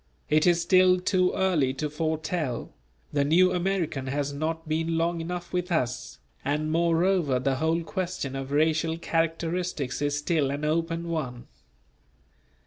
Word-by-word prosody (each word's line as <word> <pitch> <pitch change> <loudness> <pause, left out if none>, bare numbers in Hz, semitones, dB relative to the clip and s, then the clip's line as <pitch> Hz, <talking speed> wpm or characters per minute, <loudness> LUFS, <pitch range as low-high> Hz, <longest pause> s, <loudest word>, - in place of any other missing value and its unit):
It 155 +3 +4
is 175 -1 +4
still 185 +1 +5
too 185 0 +2
early 155 -9 +1
to 150 +3 -2
foretell; 155 -3 -2 0.4
the 145 -1 +2
new 180 +5 +4
American 175 -7 -1
has 140 +1 -2
not 160 +3 -3
been 165 +1 0
long 165 0 0
enough 175 +2 -5
with 180 0 -1
us, 125 -7 -1 0.3
and 150 +3 -1
moreover 170 -3 +2
the 130 +1 0
whole 160 +3 +1
question 175 -5 -3
of 135 0 -5
racial 160 +2 +2
characteristics 165 -4 -1
is 145 0 0
still 145 -2 +1
an 145 +2 -3
open 165 +2 -1
one. 135 -8 -4
160 Hz, 140 wpm, -27 LUFS, 145-175 Hz, 0.4 s, still